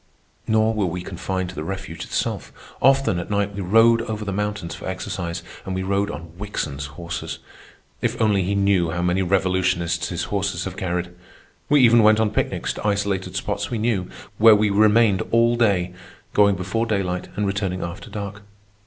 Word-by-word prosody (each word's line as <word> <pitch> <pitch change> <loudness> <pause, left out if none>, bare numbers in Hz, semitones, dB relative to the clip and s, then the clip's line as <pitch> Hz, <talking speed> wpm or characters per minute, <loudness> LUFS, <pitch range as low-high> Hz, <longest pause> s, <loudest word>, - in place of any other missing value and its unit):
Nor 110 0 +3
were 105 -4 0
we 90 +1 -4
confined 95 0 -3
to 90 - -9
the 75 - -4
refuge 85 -1 -5
itself. - - -3 0.3
Often 135 -8 +4
at 85 - -6
night 100 -1 0
we 100 - -4
rode 115 +5 +5
over 110 -2 -4
the 100 - -2
mountains 105 -3 -3
for - - -8
exercise, 85 -2 -4 0.2
and 95 - -4
we 95 - -2
rode 100 +1 0
on 85 -3 -8
Wickson's 70 -9 -4
horses. 85 -1 -5 0.6
If - - -1
only 105 -3 +3
he 95 +3 -1
knew 100 -4 +2
how 85 +2 -2
many 90 +2 +1
revolutionists 90 -2 +1
his 85 -1 -3
horses 100 0 -1
have 95 -1 -5
carried! 90 -2 -2 0.6
We 145 -1 +5
even 120 -1 +6
went 110 0 +5
on 110 -2 +2
picnics - - -1
to - - -4
isolated 100 -2 -1
spots 100 +1 -2
we 120 - -2
knew, 105 -5 0 0.3
where 110 0 +8
we 105 0 +2
remained 105 -1 +4
all 115 +1 +4
day, 95 -6 +1 0.4
going 100 -1 +5
before 100 +6 -2
daylight 95 -4 -1
and 105 - 0
returning 100 -2 -2
after 85 +6 -7
dark. 100 0 -6
100 Hz, 180 wpm, -22 LUFS, 90-105 Hz, 0.6 s, where